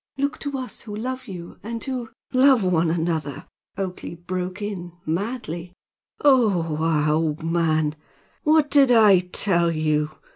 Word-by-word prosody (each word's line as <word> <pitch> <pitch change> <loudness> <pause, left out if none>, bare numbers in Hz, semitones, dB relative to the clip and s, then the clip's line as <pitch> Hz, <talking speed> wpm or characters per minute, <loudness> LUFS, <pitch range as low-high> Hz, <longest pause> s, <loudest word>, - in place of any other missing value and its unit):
Look 280 +1 -1
to 280 -1 -4
us 255 -1 -6
who 210 -2 -8
love 255 +3 -4
you, 175 -4 -9
and 230 +2 -5
who 250 -4 -4
" - - -34
"Love 260 -3 +5
one 170 -3 +2
another!" 160 -4 -2 0.3
Oakleigh 185 -3 -5
broke 180 +2 -4
in, 190 -5 -5
madly. 175 -1 -4 0.5
"Oho! 185 - +3
Aha, 155 -2 +2
old 155 0 0
man! 160 -2 +1 0.5
what 305 -1 +3
did 275 -3 +5
I 215 -5 +7
tell 180 -1 +1
you? 155 -1 0
180 Hz, 145 wpm, -23 LUFS, 165-235 Hz, 0.5 s, I